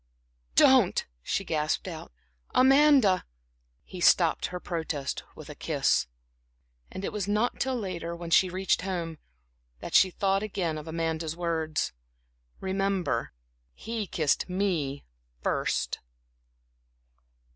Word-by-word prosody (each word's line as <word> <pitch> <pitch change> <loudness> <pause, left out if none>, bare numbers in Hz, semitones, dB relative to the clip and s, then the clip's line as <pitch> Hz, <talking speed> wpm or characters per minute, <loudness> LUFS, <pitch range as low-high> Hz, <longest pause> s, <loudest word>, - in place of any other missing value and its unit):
"Don't," - - +5 0.2
she 195 - -1
gasped 155 0 -1
out, 165 -3 -7 0.4
"Amanda" 270 -7 +5 0.6
He 185 - -9
stopped 175 -2 +4
her 180 - -6
protest 160 -6 -3
with - - -11
a - - -7
kiss. - - +1 0.8
And 190 - -5
it - - -4
was 205 -2 -2
not 210 +4 0
till 265 -1 0
later, 175 -6 -4
when 170 0 -7
she 185 +2 +5
reached 185 0 0
home, 170 -4 -4 0.6
that - - -8
she 190 - +6
thought 195 +1 0
again 180 -7 -2
of 150 - -10
Amanda's 160 -1 -2
words: 160 -2 -1 0.7
"Remember, 190 -9 -1 0.4
he 225 -3 -4
kissed 155 +1 0
me 175 -8 -1 0.4
first." - - -1
180 Hz, 115 wpm, -28 LUFS, 160-195 Hz, 0.8 s, she